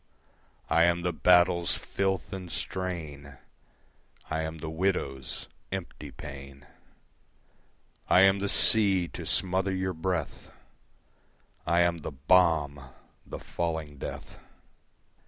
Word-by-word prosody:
I 80 Hz, +1 st, +4 dB
am 85 Hz, 0 st, +1 dB
the 90 Hz, 0 st, 0 dB
battle's 90 Hz, +1 st, +4 dB
filth 95 Hz, -1 st, -2 dB
and 90 Hz, -3 st, -6 dB
strain, 75 Hz, -8 st, -5 dB, 0.9 s
I 80 Hz, 0 st, 0 dB
am 80 Hz, +1 st, -4 dB
the 80 Hz, +1 st, -6 dB
widow's 80 Hz, -7 st, -2 dB, 0.2 s
empty -, -, -6 dB
pain. 70 Hz, 0 st, -10 dB, 1.4 s
I 90 Hz, -, +7 dB
am 95 Hz, +1 st, +5 dB
the 100 Hz, 0 st, -1 dB
sea 95 Hz, -6 st, +3 dB
to -, -, -7 dB
smother 95 Hz, +1 st, +1 dB
your 95 Hz, 0 st, -1 dB
breath, 80 Hz, -1 st, -3 dB, 1.2 s
I 85 Hz, +2 st, +4 dB
am 85 Hz, -1 st, +2 dB
the 75 Hz, -, -5 dB
bomb, 75 Hz, -1 st, +3 dB, 0.5 s
the -, -, -6 dB
falling 80 Hz, -4 st, -4 dB
death. -, -, -7 dB
85 Hz, 110 wpm, -28 LUFS, 75-95 Hz, 1.4 s, I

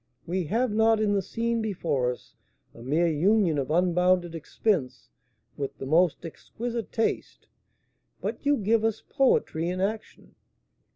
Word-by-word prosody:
We 180 Hz, +1 st, -2 dB
have 230 Hz, +8 st, 0 dB
not 220 Hz, +1 st, +3 dB
in 210 Hz, -1 st, +1 dB
the 200 Hz, -, +2 dB
scene 230 Hz, +4 st, -2 dB
before 160 Hz, -, -1 dB
us 125 Hz, -, -11 dB, 0.4 s
a -, -, -13 dB
mere 150 Hz, +8 st, +1 dB
union 170 Hz, 0 st, +2 dB
of 135 Hz, -, -3 dB
unbounded 180 Hz, +1 st, +2 dB
expense 165 Hz, -, -2 dB, 0.5 s
with 140 Hz, -1 st, -4 dB
the -, -, -6 dB
most 170 Hz, +4 st, +2 dB
exquisite 230 Hz, +7 st, -6 dB
taste, 225 Hz, -, -2 dB, 0.7 s
but -, -, -4 dB
you 285 Hz, 0 st, +3 dB
give 220 Hz, +2 st, +1 dB
us 225 Hz, -1 st, -1 dB
poetry 175 Hz, -, +1 dB
in 180 Hz, +1 st, -3 dB
action. 210 Hz, +3 st, -4 dB
185 Hz, 140 wpm, -26 LUFS, 160-220 Hz, 0.7 s, not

